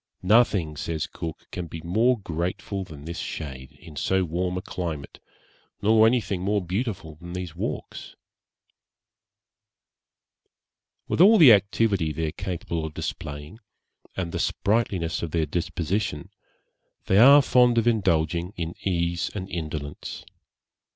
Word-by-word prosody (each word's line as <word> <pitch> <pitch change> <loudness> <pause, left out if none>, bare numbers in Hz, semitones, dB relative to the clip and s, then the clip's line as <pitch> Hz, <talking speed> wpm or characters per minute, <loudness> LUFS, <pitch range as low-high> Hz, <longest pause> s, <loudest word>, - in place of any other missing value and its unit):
'Nothing,' 95 -6 +3
says 80 +1 -3
Cook, 80 -2 -7
'can 90 -2 -5
be 80 0 -8
more 115 +9 +2
grateful 90 +2 -4
than 75 -5 -11
this 85 +1 -5
shade, 65 -4 -6
in 80 - -14
so 95 +6 +1
warm 90 +2 -2
a - - -3
climate, 80 -7 -5 0.6
nor 110 +1 +5
anything 110 -6 0
more 100 +2 +1
beautiful 95 -3 -3
than 85 0 -8
these 90 -3 -5
walks,' - - -5 2.9
With - - +1
all 215 +4 +8
the 145 - +9
activity 100 -4 +2
they 80 +2 -2
are 75 - -2
capable 85 -3 -4
of 80 -1 -6
displaying, 75 +7 -6 0.6
and 90 -3 -2
the - - -3
sprightliness 100 -6 0
of 85 - -3
their 80 0 0
disposition, 85 +1 -2 0.7
they 95 - +4
are 140 +4 +8
fond 125 -2 +4
of 115 0 +2
indulging 85 -5 +1
in 85 0 -3
ease 85 -2 -1
and 95 -2 -4
indolence. 75 -4 -5
90 Hz, 130 wpm, -25 LUFS, 80-105 Hz, 2.9 s, the